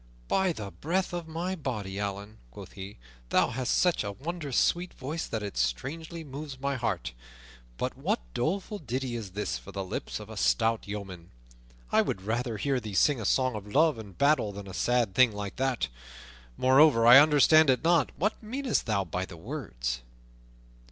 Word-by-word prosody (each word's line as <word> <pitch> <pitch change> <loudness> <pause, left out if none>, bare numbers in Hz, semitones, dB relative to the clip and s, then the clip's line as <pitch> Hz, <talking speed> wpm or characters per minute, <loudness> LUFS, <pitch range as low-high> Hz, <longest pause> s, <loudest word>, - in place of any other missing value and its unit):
"By 190 -1 +2
the 105 -10 -6
breath 180 - -2
of 175 -2 -4
my 170 +4 -3
body, 105 - -4
Allan," 100 +1 -5
quoth - - -11
he, 95 +1 -9 0.3
"thou - - +3
hast 130 +1 0
such 180 -8 +2
a 100 - -3
wondrous 150 - -4
sweet 175 +1 +1
voice 155 +5 -4
that 110 -2 -3
it 100 -8 -6
strangely 155 - -2
moves 140 -1 -8
my 140 +1 -1
heart. 115 - -2 0.6
But - - -2
what - - -1
doleful 195 - -2
ditty 130 -3 -3
is 105 -6 -6
this 100 -10 -2
for - - -11
the 100 - -4
lips 95 - -4
of 105 - -9
a 110 -1 -9
stout 115 0 +1
yeoman? 95 -4 -7 0.6
I - - +5
would 95 - -3
rather 115 +2 -2
hear 135 +4 0
thee 105 -4 -7
sing 140 +3 +3
a - - -4
song 130 +3 +2
of 105 -1 -6
love 150 +3 +3
and 100 -5 -11
battle 140 -7 +3
than 100 0 -8
a 95 - -8
sad 120 -3 +1
thing 125 -1 +5
like 100 -1 -6
that. 130 - 0 0.7
Moreover, 130 -2 +5
I 120 +3 +11
understand 155 +1 +6
it 130 +2 +2
not; 165 -4 +3
what 210 +8 -1
meanest 250 - -2
thou 105 -3 +1
by 90 +2 -3
the 85 - -11
words?" - - -4
125 Hz, 185 wpm, -28 LUFS, 100-155 Hz, 0.7 s, I